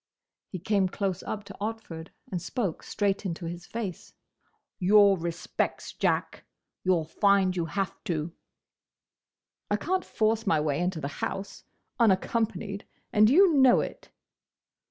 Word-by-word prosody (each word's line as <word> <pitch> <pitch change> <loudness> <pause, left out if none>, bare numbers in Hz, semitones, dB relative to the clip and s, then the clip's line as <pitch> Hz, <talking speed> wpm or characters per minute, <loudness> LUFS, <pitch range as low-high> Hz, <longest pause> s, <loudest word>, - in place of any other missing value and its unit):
He 185 - -5
came 190 +1 +1
close 190 -1 -2
up 210 -1 -5
to 200 -1 -11
Otford, 210 -7 -5 0.2
and 180 -2 -2
spoke 185 -1 -2
straight 200 -2 -1
into 170 -3 -4
his 175 +1 -6
face. 200 -3 -6 0.7
"Your 200 +1 +6
respects, 170 -1 -3
Jack! - - -1 0.4
You 185 0 +4
'll 160 -2 -1
find 195 +2 +3
you 170 -2 0
have 195 +4 -3
to!" 165 -1 -2 1.4
"I 205 - +2
can't 365 - -1
force 220 0 0
my 160 - +3
way 150 -2 0
into 180 -1 -1
the 140 - -3
house, 195 +1 -4 0.3
unaccompanied, 215 -1 +1 0.3
and 215 -1 +6
you 355 +5 +6
know 265 -3 +6
it!" - - -7
195 Hz, 135 wpm, -28 LUFS, 175-215 Hz, 1.4 s, Your